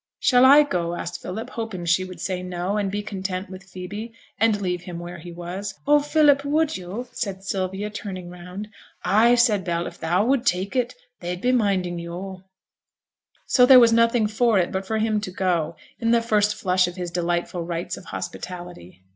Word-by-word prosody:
'Shall 250 0 +5
I 285 +3 +8
go?' 175 -11 -2
asked 175 - -5
Philip, 220 +7 -6
hoping 220 -7 -5
she 180 +2 +2
would 185 -1 -9
say 185 -2 -2
'no', 180 +2 -3
and 205 -2 0
be 205 +1 -3
content 190 -2 -4
with 185 0 -8
Phoebe, 195 +4 -7 0.3
and 220 -2 +3
leave 180 -3 -2
him 180 -2 -7
where 175 0 -7
he 175 +2 -9
was. 180 +3 -6
'Oh, 295 +1 +5
Philip, 290 -1 +4
would 305 +2 +1
yo'?' 190 +7 -6
said 195 -4 -4
Sylvia, 195 +2 -3
turning 185 -4 -6
round. 180 +4 -8 0.4
'Ay,' 225 +5 +5
said 225 -5 +3
Bell, 170 -1 -1
'if - - -8
thou 175 +5 +1
would 260 0 +2
take 190 +6 0
it 250 0 0 0.2
they'd 175 0 -4
be 250 +6 +1
minding 190 -7 +1
yo'.' 180 +2 -7 1.0
So 250 -2 +5
there 260 -1 +10
was 230 -1 +6
nothing 230 0 +3
for 220 +1 +2
it 175 -2 +1
but 190 0 -3
for 220 - -1
him 215 -1 +1
to 195 - -4
go, 175 -3 -1 0.2
in 230 - 0
the 230 0 +3
first 210 -2 +2
flush 185 -2 +2
of 175 - -6
his 180 -2 -5
delightful 175 0 -1
rites 170 +1 -3
of - - -12
hospitality. 175 - -8
190 Hz, 195 wpm, -23 LUFS, 180-225 Hz, 1.0 s, there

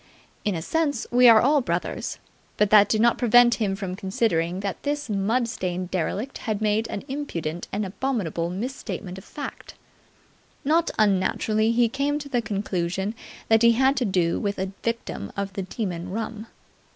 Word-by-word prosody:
In 205 -4 0
a 160 - -4
sense, 290 - 0
we 245 0 +7
are 225 -1 +8
all 285 +3 +4
brothers; 245 - -3 0.4
but 210 -1 +2
that 205 -1 +7
did 215 - +2
not 235 0 +3
prevent 240 0 +6
him 195 -3 +1
from 190 -2 -4
considering 190 -3 0
that 200 -2 -4
this 290 -4 -2
mud 220 +5 +1
stained 185 -5 -3
derelict 200 +8 -2
had 215 -3 -2
made 215 +1 +1
an 200 - -5
impudent 175 - -4
and 205 +1 -1
abominable 190 - -2
mis 230 +9 -4
statement 190 -7 -6
of - - -14
fact. 290 - -8 0.9
Not 320 +3 +3
unnaturally 215 +2 +2
he 235 0 +3
came 280 +4 -1
to 290 -1 -7
the 245 -3 +1
conclusion 195 -2 -2 0.3
that 225 0 +4
he 235 0 +6
had 265 +3 +3
to 255 - +1
do 180 -4 +1
with 200 -1 -2
a 190 0 -3
victim 230 - -3
of 200 -1 -3
the 195 - -3
Demon 185 -3 -4
Rum. 220 +2 -5
215 Hz, 175 wpm, -25 LUFS, 190-245 Hz, 0.9 s, are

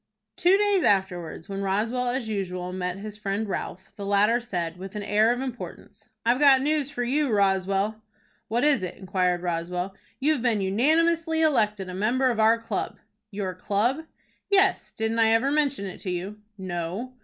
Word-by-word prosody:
Two 365 +2 +4
days 410 -2 +2
afterwards, 180 -5 0
when 195 0 -4
Roswell 220 +6 0
as 245 -2 -2
usual 185 -4 -3
met 180 0 -3
his 210 +1 -7
friend 205 +1 -2
Ralph, 190 -1 -5
the 200 - -6
latter 205 +4 +3
said, 175 -8 -4
with 190 +2 -9
an 210 - -3
air 210 +3 +3
of 245 +1 -1
importance: 255 -2 -8 0.2
"I've 240 +3 +3
got 275 -2 +6
news 295 -1 0
for 280 -4 -3
you, 275 +2 +1
Roswell." 195 +1 +1 0.5
"What 235 +2 0
is 295 -7 +3
it?" 185 - -4
inquired 180 -2 0
Roswell. 180 +2 -2 0.3
"You've 290 -1 +1
been 235 -4 +1
unanimously 320 - +2
elected 210 -10 +2
a 185 - -6
member 245 +7 +1
of 225 - -3
our 220 +1 +5
club." 230 - -4 0.3
"Your 195 -3 -4
club?" 230 - -1 0.4
"Yes; 390 -1 +3
didn't 220 +1 -2
I 225 - +5
ever 255 +5 +2
mention 285 -7 +1
it 190 - -7
to 190 - -5
you?" 185 +4 -4 0.2
"No." 185 +6 -4
215 Hz, 175 wpm, -26 LUFS, 190-260 Hz, 0.5 s, got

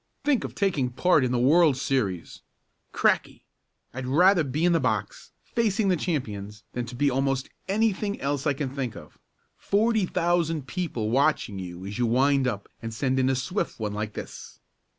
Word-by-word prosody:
Think 290 -4 +2
of - - -6
taking 165 -11 +1
part 150 +4 +3
in 125 - 0
the 125 - +1
World's 145 +2 +4
series! 105 -11 -2 0.5
Cracky! - - +1 0.5
I'd 125 +1 -5
rather 175 +6 +5
be 150 +4 -1
in 175 - +4
the 165 - +3
box, - - -2
facing 220 -3 0
the 185 - +4
champions, 105 - -4
than 120 -1 -3
to 125 - -8
be 140 +2 +2
almost 135 0 0 0.2
anything 205 0 0
else 140 +1 -1
I 145 - +3
can 135 -1 -3
think 130 -4 -4
of. 75 - -13 0.4
Forty 215 -1 +1
thousand 165 -4 0
people 130 - -3
watching 135 -6 +1
you 90 0 -7
as 100 +4 -6
you 120 - +2
wind 135 +3 +3
up 105 -5 -3
and 115 -1 -5
send 130 +3 0
in 130 0 +2
a 135 - +2
swift 180 +7 -3
one 105 -2 -2
like 105 0 -4
this!" - - -9
135 Hz, 180 wpm, -26 LUFS, 120-175 Hz, 0.5 s, rather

